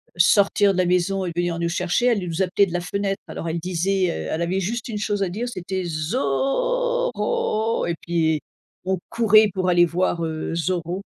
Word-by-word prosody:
sortir 200 +3 +4
de - - -4
la 185 - +3
maison 180 +2 +1
et - - -3
de - - -7
venir 175 -1 -1
nous 170 - 0
chercher, 175 +6 0
elle 225 -7 +2
nous 170 +1 -2
appelait 190 +2 +3
de - - -8
la 175 - 0
fenêtre. 195 +2 -2
Alors 165 - -6
elle 170 +1 -2
disait, 185 +2 0
heu, 80 0 -5
elle 160 - -2
avait 185 +3 0
juste 225 +5 -3
une 215 -3 -4
chose 205 -1 -1
à - - 0
dire, 225 +7 -3
c'était: 185 -2 -4
«Zorro!» 275 - 0
Et 170 - -1
puis 160 -2 +1 0.5
on 190 0 0
courait 215 -2 +5
pour 185 -1 -1
aller 175 -1 +5
voir, 170 0 -1
heu, 160 0 -3
Zorro! 175 +1 -2
185 Hz, 200 wpm, -23 LUFS, 170-205 Hz, 0.5 s, courait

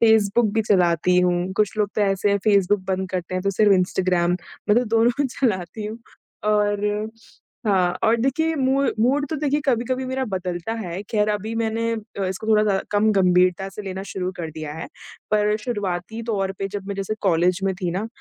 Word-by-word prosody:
Facebook 220 0 +4
भी 220 0 +1
चलाती 180 -3 +3
हूँ, 180 +1 +1
कुछ 210 0 +1
लोग 210 -1 +2
तो - - 0
ऐसे 200 0 +2
हैं 200 - +2
फेसबुक 200 -1 +3
बंद 190 0 -1
करते 185 -1 -3
हैं 185 - -1
तो 195 - +1
सिर्फ 205 +1 +4
इंस्टाग्राम, 180 -1 +2 0.3
मैं 210 - +5
तो 250 - 0
दोनों 240 +5 +3
चलाती 210 -5 -2
हूँ। 220 +2 -6 0.5
और 210 -1 +2 0.8
हाँ 190 -4 +3 0.2
और 225 +1 +4
देखिए 285 +7 0
मूड 270 0 +2
मूड 275 +5 +2
तो 315 - -1
देखिए 295 0 0
कभी-कभी 255 0 0
मेरा 260 +1 -1
बदलता 185 -2 -3
है। 190 -4 -5
खैर 210 -1 +2
अभी 210 +2 -2
मैंने 230 0 -1
अ, 215 -3 -5
इसको 190 +3 -4
थोड़ा 215 -1 +4
ज्या 200 -2 +2
कम 210 +1 +3
गंभीरता 185 -1 +3
से 195 +2 -8
लेना 190 -1 -5
शुरू 185 -1 -2
कर 165 -2 -5
दिया 155 -1 -6
है। 160 - -6 0.4
पर 210 0 +2
शुरुआती 205 -2 -3
तौर 200 -4 -1
पे 195 - -2
जब 200 -1 -6
मैं 200 - -2
जैसे 195 +2 -3
कॉलेज 180 0 +2
में 195 -1 +1
थी 175 - 0
ना, 190 +5 -2
205 Hz, 195 wpm, -23 LUFS, 185-225 Hz, 0.8 s, मैं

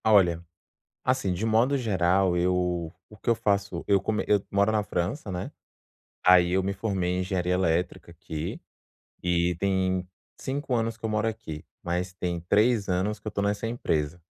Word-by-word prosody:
Olha, 90 -6 +4 0.6
assim 125 -8 +1
de 95 +5 -3
modo 115 +5 +3
geral 95 -5 +2
eu 90 -1 0 0.2
o 105 - -13
que - - -7
eu 115 - +5
faço, 100 -5 -1
eu 100 -1 +4
como 105 +2 -1
eu 105 -2 +3
moro 100 +2 +3
na 105 -1 +2
França, 100 - -3
né, 90 -1 -4 0.7
aí 90 -1 +7
eu 95 0 +2
me 100 - 0
formei 95 -3 -1
em 90 - 0
engenharia 90 -1 0
elétrica 90 -1 0
aqui, 80 -2 -6 0.6
e 90 0 +1
tem 95 -2 0 0.3
5 140 0 -3
anos 115 -1 0
que 115 - -28
eu 110 - 0
moro 110 +1 +1
aqui, 80 -9 -5 0.2
mas 90 +2 -2
tem 90 -2 -3
3 110 0 +3
anos 95 +3 0
que 105 - -10
eu - - +1
estou 100 -1 -2
nessa 100 +2 0
empresa, 85 -8 -1
95 Hz, 175 wpm, -27 LUFS, 90-105 Hz, 0.7 s, aí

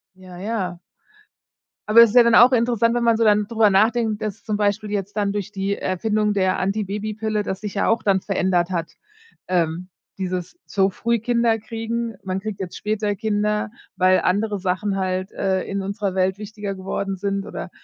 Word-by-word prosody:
Ja, 185 -1 -12
ja. 185 -3 -3 1.1
Aber 225 +2 +8
es 230 - +6
ist 245 - -7
ja 245 - +9
dann 235 -1 +4
auch 250 +2 +7
interessant, 235 -1 +2
wenn 240 - 0
man 230 -1 +3
so 230 - +2
dann 210 -1 +4
drüber 225 -2 +3
nachdenkt, 220 +2 +2
dass 210 -1 -5
zum 215 - -2
Beispiel 205 0 0
jetzt 205 0 -3
dann 200 -1 0
durch 205 -1 -4
die 200 0 -2
Erfindung 210 +3 0
der 185 -2 +1
Antibabypille 210 +2 -2
das 190 -1 -4
sich 210 -2 -5
ja 200 - 0
auch 230 +1 +1
dann 195 -2 +2
verändert 185 -3 0
hat, 170 -3 -3 0.6
ähm, 175 0 0 0.3
dieses 185 - -4
so 195 -1 +1
früh 235 +4 -1
Kinder 235 0 +1
kriegen. 225 0 -4
Man 185 0 -2
kriegt 200 0 -6
jetzt 180 -2 -6
später 210 -1 -1
Kinder, 210 0 -1 0.3
weil 185 0 +4
andere 205 +1 0
Sachen 190 +2 -1
halt, 185 0 -2
äh, 190 -1 0
in 200 0 -3
unserer 200 -1 -3
Welt 190 +1 +1
wichtiger 210 -1 -6
geworden 195 +1 -3
sind 195 +1 -2
oder, - - -6
205 Hz, 185 wpm, -22 LUFS, 190-220 Hz, 1.1 s, ja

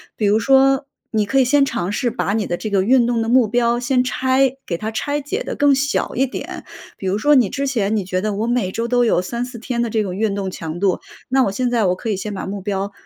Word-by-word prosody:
比 215 - -1
如 210 +2 +3
说 270 +2 +4 0.3
你 215 -2 +1
可 270 +6 +1
以 260 - +4
先 280 +3 +4
尝 185 -8 -2
试 240 +4 0
把 220 -4 -1
你 215 -1 0
的 175 - -2
这 215 - -4
个 195 -2 +2
运 240 +2 +4
动 240 -1 0
的 225 - -2
目 245 -2 +4
标 235 +1 +1
先 250 +1 +1
拆 260 +1 +1
给 170 - -2
它 215 +4 -4
拆 285 +6 -2
解 385 - -3
得 - - -5
更 285 -1 +4
小 280 +1 0
一 265 - +2
点。 260 - -7 0.3
比 190 - -5
如 190 +2 +1
说 295 +8 +3
你 245 -7 +4
之 280 0 -2
前 220 -6 0
你 210 - 0
觉 185 0 -2
得 215 +1 -1
我 215 +3 -2
每 240 -6 0
周 230 +4 -2
都 245 0 +2
有 220 - +2
3-4 240 +5 -5
天 235 +1 -3
的 235 - -1
这 220 0 0
种 185 -3 -4
运 205 0 0
动 195 -1 -3
强 165 -1 -6
度， 190 -1 +1 0.3
那 265 0 +3
我 195 - -1
现 250 +5 -1
在 230 -4 +2
我 180 0 +2
可 225 - -5
以 205 - 0
先 205 +2 -5
把 195 - -5
目 200 0 -5
标 200 0 -3
230 Hz, 290 characters per minute, -20 LUFS, 200-260 Hz, 0.3 s, 说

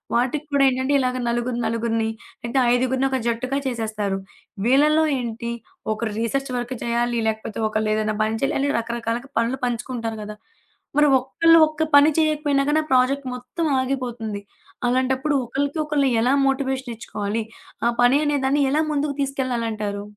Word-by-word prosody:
వాటికి 260 +5 0
కూడా 280 -1 +4
ఏంటంటే 260 +2 -1
ఇలాగ 255 0 0
నలుగురు 240 +1 -1
నలుగురిని 225 0 0 0.6
ఐదుగురిని 260 +2 +1
ఒక 265 - +1
జట్టుగా 255 +4 -1
చేసేస్తారు. 215 -5 -2 0.5
వీళ్ళలో 300 +5 +4 0.2
ఏంటి, 235 -1 -4 0.4
ఒకరు 215 +1 -2
రిసర్చ్ 270 +4 -1
వర్క్ 245 +1 -3
చేయాలి. 235 0 0
లేకపోతే 220 -1 -3
ఒకళ్ళు 215 0 -1
ఏదైనా 215 0 0
పని 220 +1 0
చేయాలి 275 - 0
అని 280 - +1
రకరకాలుగా 235 +2 -3
పనులు 230 +3 +1
పంచుకుంటారు 235 -2 -3
కదా! 210 0 -7 0.6
మరి 295 0 +6
ఒక్కళ్ళు 330 +6 +4
ఒక్క 310 0 -2
పని 285 +2 +8
చేయకపోయినా 300 -3 +2
గానీ 310 +1 +3
ప్రాజెక్ట్ 260 +2 +3
మొత్తం 250 +7 -4
ఆగిపోతుంది. 245 -5 -3 0.5
అలాంటప్పుడు 260 +3 +1
ఒకళ్ళకి 280 +5 -2
ఒకళ్ళు 295 -2 +1
ఎలా 250 +3 +3
మోటివేషన్ 265 -2 -1
ఇచ్చుకోవాలి? 215 0 -3 0.4
ఆ - - +4
పని 245 +3 +5
అనేదాన్ని 285 -1 +1
ఎలా 305 +3 +2
ముందుకు 290 0 0
తీసుకెళ్లాలంటారు? 230 -7 -2
250 Hz, 140 wpm, -22 LUFS, 230-275 Hz, 0.6 s, పని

